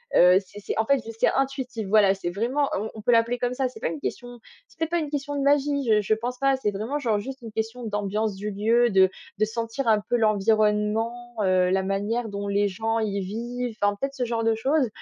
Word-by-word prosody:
Heu, 180 +1 +7
c'est 205 +3 -12
c'est 205 - -4
en 220 - +2
fait, 275 +4 +3
je - - -13
c'est - - -6
c'est - - +5
intuitif, 265 -5 -2
voilà. 200 -1 +5
C'est 195 -3 -4
vraiment 245 +10 0
on 215 +3 -4
on 220 - -9
peut 230 - +2
l'appeler 235 +1 +3
comme 245 0 -1
ça. 265 0 0
C'est 255 - -11
pas - - -1
une 310 - -4
question 245 -3 -5 0.3
c'est - - -24
peut 325 - 0
être 320 - -11
pas 345 - +2
une 305 -3 -3
question 290 0 -3
de 285 - -1
magie, 280 -1 +2
je 210 -1 +4
je 210 +2 +1
pense 240 +3 -3
pas. 275 +1 +2
C'est 235 -5 -1
vraiment, 220 +9 -3
genre, 230 -6 +1
juste 265 +6 -6
une 230 -2 -8
question 225 +3 -4
d'ambiance 210 0 -1
du 210 +2 -4
lieu, 230 +4 +2
de 190 -1 +5 0.3
de 215 - +4
sentir 230 +4 -4
un 215 -2 +5
peu - - +1
l'environnement, 215 +2 +1
heu, 185 -2 +3
la 190 0 +2
manière 205 +5 -2
dont 200 0 -4
les 200 0 +2
gens 225 +4 -1
y 200 -3 -1
vivent, 235 +4 -4
en 205 0 +2
fait, 275 +5 -3
ce 265 -3 -3
genre 230 -1 -1
de 225 0 +3
choses. 265 +5 +1
225 Hz, 250 wpm, -25 LUFS, 205-250 Hz, 0.3 s, Heu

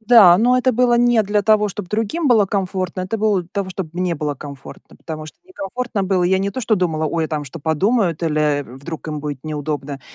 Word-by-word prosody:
Да, 220 -6 +7
но 245 +4 +4
это 255 0 +2
было 245 +1 +3
не 240 -2 +4
для 205 0 0
того, 215 -1 +3
чтоб 195 -1 -7
другим 225 - -1
было 215 -5 +5
комфортно, 185 -2 -2
это 195 +5 -3
было 205 -4 +2
для 170 - -19
того, 195 -2 -2
чтобы 180 -4 -5
мне 180 -1 -1
было 145 -1 -2
комфортно, 140 -1 -11
потому 155 -2 -7
что - - -13
некомфортно 245 - -4
было. 185 -1 +1
Я 190 +1 +3
не 195 +1 -1
то 260 - -5
что 220 -2 +2
думала: 160 -4 0
"Ой, 165 +1 -1
а - - -4
там 150 -2 -3
что 145 +5 -9
подумают?" 175 - +1
Или, 155 -2 0 0.2
э, - - -4
"Вдруг 140 +7 -9
им 150 -1 -4
будет 145 -3 -5
неудобно". 145 -2 -4
185 Hz, 230 wpm, -20 LUFS, 155-215 Hz, 0.2 s, Да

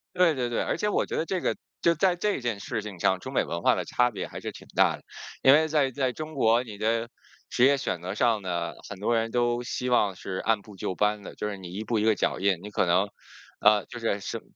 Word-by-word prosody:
对 180 -3 +4
对 125 -2 -2
对， 120 - 0
而 - - -1
且 210 - -1
我 - - +1
觉 - - -4
得 160 - 0
这 185 +1 -2
个 - - 0 0.2
就 170 0 +4
在 180 +3 +2
这 205 -2 0
件 120 -5 -2
事 110 - -3
情 100 -5 -8
上， 95 +2 +3
中 - - -8
美 - - +2
文 85 0 -4
化 - - +5
的 - - -2
差 125 0 +2
别 105 - -5
还 - - -8
是 - - -5
挺 - - -13
大 - - +4
的。 - - -19 0.4
因 135 - +8
为 155 +1 +4
在 145 -3 +2
在 130 -1 -1
中 155 +2 -7
国， 115 -2 +3
你 110 -4 -9
的 115 +2 0 0.4
职 120 - +3
业 140 +1 +5
选 90 -9 -2
择 90 +1 -4
上 115 -3 +2
呢， 85 -2 -2 0.2
很 100 -2 -8
多 115 +3 +1
人 115 0 0
都 120 0 +1
希 125 0 -3
望 105 -6 +3
是 95 +1 -7
按 110 -2 +2
部 105 0 -14
就 95 - -3
班 105 +1 +1
的。 - - -9
就 105 - -3
是 100 - -4
你 90 -2 -9
一 105 +3 -4
步 110 0 -1
一 105 - +1
个 110 0 +4
脚 - - 0
印 95 -2 +2
你 105 - -8
可 - - +1
能， 90 +4 +2 0.5
呃， 105 -1 +5
就 120 - -8
是 110 -3 -1
是 - - -5
115 Hz, 295 characters per minute, -27 LUFS, 100-130 Hz, 0.5 s, 因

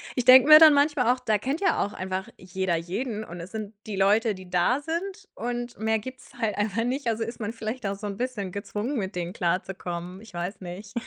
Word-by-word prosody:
Ich 250 - -1
denke 255 +1 +9
mir 305 0 +11
dann 315 -2 +9
manchmal 285 -4 +3
auch, 255 - -7
da 220 -4 +1
kennt 270 +9 -2
ja 395 - +2
auch 205 - -4
einfach 185 0 -4
jeder 185 -1 -2
jeden 210 +7 -3
und 175 -4 -9
es 170 +3 -9
sind 215 -1 -6
die 210 - -4
Leute, 205 +3 +3
die 185 -1 -12
da 180 +9 +2
sind 340 +5 -4
und 240 +1 -4
mehr 220 0 +1
gibt's 255 +3 -10
halt 215 -3 0
einfach 210 +2 0
nicht, 255 +2 -2
also 225 0 0
ist 230 +1 -7
man 215 -1 -3
vielleicht 230 +1 -5
auch 195 - -1
so 205 +1 -6
'n 200 -1 -5
bisschen 240 -7 -3
gezwungen, 210 +7 -4
mit 195 -3 -3
denen 175 0 -3
klarzukommen. 180 0 -3
Ich 225 - -15
weiß 175 +4 -5
nicht. 185 +3 -8
215 Hz, 230 wpm, -26 LUFS, 190-250 Hz, -, mir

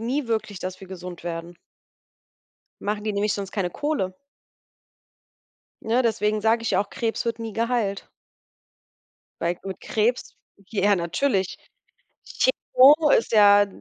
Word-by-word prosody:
nie 250 +4 -2
wirklich, 215 -3 -2
dass 185 +1 -6
wir 190 - -11
gesund 180 -2 -9
werden. 170 0 -5 1.3
Machen 210 0 -2
die 215 - -1
nämlich 205 +1 0
sonst 195 -1 -5
keine 190 -4 -1
Kohle. 190 -12 -2 1.6
Ne, 235 +3 +1
deswegen 215 -2 0
sage 225 +2 +2
ich 230 - 0
auch, 205 - 0
Krebs 225 -2 -2
wird 230 -1 -1
nie 225 -2 -5
geheilt. 230 -4 -1 1.3
Weil 170 +1 0
mit 190 -1 -6
Krebs 230 +3 -1 0.3
ja 205 -1 +2
natürlich. 190 +3 -1 0.7
Chemo 300 - +4
ist 230 - +3
ja 205 -1 +6
210 Hz, 125 wpm, -24 LUFS, 190-230 Hz, 1.6 s, ja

